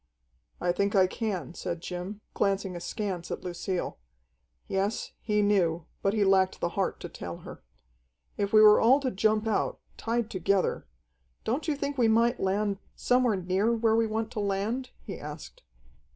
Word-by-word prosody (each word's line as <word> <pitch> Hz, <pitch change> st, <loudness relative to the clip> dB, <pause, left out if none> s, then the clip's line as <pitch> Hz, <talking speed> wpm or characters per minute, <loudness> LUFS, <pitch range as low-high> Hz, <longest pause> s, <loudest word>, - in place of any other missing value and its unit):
"I 175 Hz, -, +1 dB
think 200 Hz, +3 st, 0 dB
I 190 Hz, -1 st, +6 dB
can," 185 Hz, -, -3 dB
said 170 Hz, -1 st, -4 dB
Jim, 180 Hz, +4 st, -6 dB
glancing 195 Hz, -2 st, 0 dB
askance 175 Hz, 0 st, -4 dB
at -, -, -5 dB
Lucille. 180 Hz, -, -3 dB, 0.7 s
Yes, 195 Hz, +3 st, -1 dB
he 210 Hz, -1 st, +1 dB
knew, 175 Hz, -5 st, +2 dB, 0.2 s
but 195 Hz, +2 st, +1 dB
he 210 Hz, -, +3 dB
lacked 190 Hz, -1 st, +3 dB
the 170 Hz, -, 0 dB
heart 190 Hz, +2 st, -1 dB
to -, -, -5 dB
tell 85 Hz, -, -7 dB
her. -, -, -9 dB, 0.7 s
"If 200 Hz, -1 st, -1 dB
we 215 Hz, -, +7 dB
were 210 Hz, 0 st, +8 dB
all 255 Hz, +5 st, +6 dB
to 260 Hz, -2 st, -1 dB
jump 215 Hz, +2 st, +2 dB
out, 220 Hz, -, 0 dB, 0.2 s
tied 230 Hz, -1 st, -1 dB
together 190 Hz, +1 st, 0 dB, 0.6 s
don't 260 Hz, +9 st, -1 dB
you 305 Hz, -, +1 dB
think 280 Hz, -1 st, -3 dB
we 235 Hz, -, +5 dB
might 230 Hz, +2 st, +3 dB
land 200 Hz, +1 st, 0 dB, 0.2 s
somewhere 245 Hz, -3 st, +2 dB
near 190 Hz, +5 st, +1 dB
where 225 Hz, -1 st, +2 dB
we 225 Hz, 0 st, +3 dB
want 220 Hz, +1 st, -2 dB
to 225 Hz, -, -4 dB
land?" 205 Hz, +6 st, -1 dB
he 200 Hz, -, -7 dB
asked. 150 Hz, +1 st, -9 dB
200 Hz, 165 wpm, -28 LUFS, 185-225 Hz, 0.7 s, were